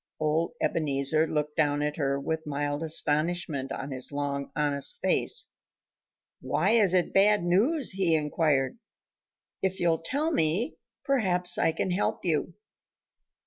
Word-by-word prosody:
Old 160 Hz, +7 st, 0 dB
Ebenezer 155 Hz, +1 st, +1 dB
looked 150 Hz, -1 st, -2 dB
down 145 Hz, -2 st, +1 dB
at 150 Hz, 0 st, -2 dB
her 140 Hz, -2 st, 0 dB
with 160 Hz, +2 st, -4 dB
mild 145 Hz, 0 st, -2 dB
astonishment 155 Hz, -2 st, -1 dB
on 140 Hz, +1 st, -5 dB
his 130 Hz, +1 st, -4 dB
long, 140 Hz, -1 st, -3 dB
honest 145 Hz, -2 st, -1 dB
face. -, -, 0 dB, 1.0 s
"Why 185 Hz, +6 st, +1 dB
is 205 Hz, -5 st, +4 dB
it 180 Hz, -, +1 dB
bad 205 Hz, -1 st, +4 dB
news?" 230 Hz, -, +2 dB
he 185 Hz, -4 st, +2 dB
inquired. 150 Hz, -, 0 dB, 0.8 s
"If 190 Hz, 0 st, -1 dB
you'll 165 Hz, -2 st, +1 dB
tell 285 Hz, -, -1 dB
me, 185 Hz, -, +1 dB, 0.3 s
perhaps 180 Hz, -10 st, +2 dB
I -, -, +3 dB
can 165 Hz, +3 st, -2 dB
help 180 Hz, -, -1 dB
you." -, -, -1 dB
160 Hz, 135 wpm, -27 LUFS, 145-185 Hz, 1.0 s, is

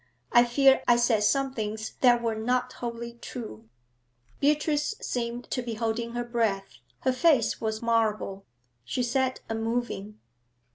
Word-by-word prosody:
I 240 Hz, 0 st, +6 dB
fear 270 Hz, +2 st, +4 dB
I 240 Hz, -, +6 dB
said 235 Hz, -2 st, +3 dB
some 270 Hz, +5 st, +2 dB
things 220 Hz, -1 st, -4 dB
that 240 Hz, -2 st, +5 dB
were 230 Hz, -1 st, +1 dB
not 245 Hz, +3 st, -1 dB
wholly 235 Hz, 0 st, -6 dB
true.' 115 Hz, -, -8 dB, 0.7 s
Beatrice 295 Hz, +4 st, +1 dB
seemed 240 Hz, 0 st, -3 dB
to 250 Hz, -, 0 dB
be 235 Hz, -2 st, -4 dB
holding 230 Hz, +1 st, -2 dB
her 240 Hz, 0 st, -2 dB
breath. 205 Hz, -, -1 dB, 0.2 s
Her 260 Hz, -, +2 dB
face 275 Hz, -4 st, +3 dB
was 220 Hz, 0 st, -2 dB
marble. 215 Hz, -4 st, 0 dB, 0.4 s
She 250 Hz, -, -2 dB
sat 260 Hz, +1 st, 0 dB
unmoving. 225 Hz, -2 st, -3 dB
235 Hz, 140 wpm, -27 LUFS, 220-250 Hz, 0.7 s, I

